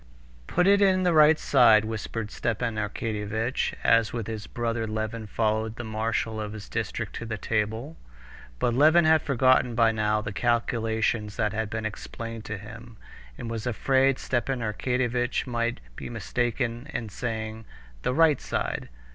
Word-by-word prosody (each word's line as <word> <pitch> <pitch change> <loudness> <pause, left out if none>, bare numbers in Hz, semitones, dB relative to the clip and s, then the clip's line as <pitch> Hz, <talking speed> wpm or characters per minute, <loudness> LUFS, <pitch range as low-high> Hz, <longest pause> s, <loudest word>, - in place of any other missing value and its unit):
"Put 180 - +2
it 200 +1 +5
in 190 -2 +4
the 175 -1 +3
right 155 0 +7
side," 115 -8 +5
whispered 110 0 -4
Stepan 120 0 -1
Arkadyevitch, 105 +2 -2
as 115 -1 +4
with 115 -3 -3
his 110 -1 -6
brother 115 -1 -2
Levin 110 +1 -3
followed 110 +1 0
the 120 - -6
marshal 110 0 -2
of 105 0 -5
his 105 -2 -8
district - - -3
to 115 - -6
the 110 -1 -3
table. 110 +9 -2 0.6
But 120 - +1
Levin 155 +6 +5
had 160 -1 +5
forgotten 130 -3 +3
by 115 -1 +4
now 105 -1 +1
the 105 -1 -5
calculations 115 -2 0
that 105 0 0
had 110 -1 -2
been 110 -1 -4
explained 115 +1 -6
to 105 - -4
him, 115 +3 -11 0.4
and 120 - -6
was 115 +1 -4
afraid 130 +3 +2
Stepan 130 0 -1
Arkadyevitch 125 +2 -1
might 120 -1 -1 0.2
be - - -7
mistaken 120 +3 -2
in 115 -7 -4
saying 110 0 -4 0.4
"the 125 - -1
right 155 -3 +4
side." - - -3
115 Hz, 155 wpm, -26 LUFS, 110-125 Hz, 0.6 s, right